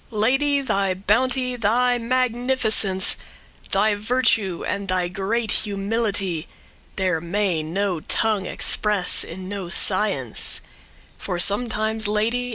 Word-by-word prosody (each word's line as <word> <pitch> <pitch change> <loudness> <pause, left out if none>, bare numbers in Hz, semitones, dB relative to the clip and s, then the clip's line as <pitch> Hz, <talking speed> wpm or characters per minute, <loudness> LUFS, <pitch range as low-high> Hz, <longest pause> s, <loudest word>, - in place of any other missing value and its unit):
Lady! 270 +6 +1
thy 195 -7 0
bounty, 250 +6 +1
thy 245 +2 +2
magnificence, 240 -5 +1 0.6
Thy 210 +2 +3
virtue, 215 -4 +1
and 200 -1 -3
thy 185 -1 +1
great 200 +5 -1
humility, 200 -4 -1 0.5
There 185 -4 0
may 175 -1 0
no 180 +3 -2
tongue 210 +4 +1
express 210 -4 +1
in 185 +2 -8
no 195 -3 -5
science: 185 - +1 0.6
For 180 - -3
sometimes, 220 +2 +1
Lady! 230 +4 0
210 Hz, 105 wpm, -22 LUFS, 190-235 Hz, 0.6 s, Thy